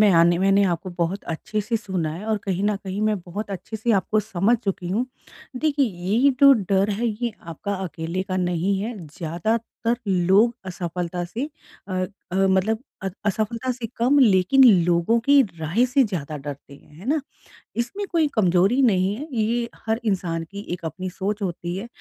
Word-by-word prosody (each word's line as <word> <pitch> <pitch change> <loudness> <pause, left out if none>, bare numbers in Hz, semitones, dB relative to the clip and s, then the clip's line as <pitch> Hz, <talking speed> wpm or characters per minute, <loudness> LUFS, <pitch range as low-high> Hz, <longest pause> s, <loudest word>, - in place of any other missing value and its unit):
मैं 210 - +6
आने 170 +1 +5
मैंने 195 +2 +4
आपको 180 0 -1
बहुत 175 +4 -1
अच्छे 210 +6 -3
से 230 +3 -1
सुना 185 -8 -2
है 180 +6 -7
और 220 -1 +1
कहीं 190 -1 -1
न 210 0 +2
कहीं 190 +2 -3
मैं 215 -2 +1
बहुत 200 +5 -6
अच्छे 195 +3 -5
से 225 +2 +1
आपको 210 +2 +2
समझ 210 +3 +1
चुकी 190 -3 -2
हूँ। 225 +8 0 0.5
देखिए, 285 -1 +2
ये 205 +8 +2
जो 280 -1 +9 0.2
डर 195 +1 +3
है 225 +4 -1
ये 230 +1 -2
आपका 170 +5 -5
अकेले 170 +2 -3
का 185 -1 -3
नहीं 180 +2 0
है 225 +2 -4
ज़्यादातर 215 +9 -2
लोग 190 +6 +4
असफ़लता 175 -1 -3
से 240 - -4 0.4
अ 190 - -5 0.4
अ, - - -2
मतलब 195 +4 +2 0.2
अ 195 - -1 0.2
असफ़लता 220 +5 -1
से 240 -2 -5
कम 255 +5 +3
लेकिन 225 +3 +5 0.2
लोगों 175 +7 +2
की 280 +3 +5 0.2
राय 190 +11 +2
से 270 +2 +3
ज़्यादा 155 -7 -4
डरते 140 0 -8
हैं, 150 - -19
है 200 - -11
ना? 305 0 +2 0.6
इसमें 245 +13 -2
कोई 325 -3 +3
कमज़ोरी 195 +5 +3
नहीं 195 -5 +3
है 290 +7 -6
ये 235 +2 0 0.2
हर 220 +1 +1
इंसान 175 -5 -1
की 200 +1 -7
एक 170 -2 -6
अपनी 185 +4 -4
सोच 200 +3 -3
होती 175 -1 -3
है। 215 +5 -5
200 Hz, 185 wpm, -23 LUFS, 180-230 Hz, 0.6 s, जो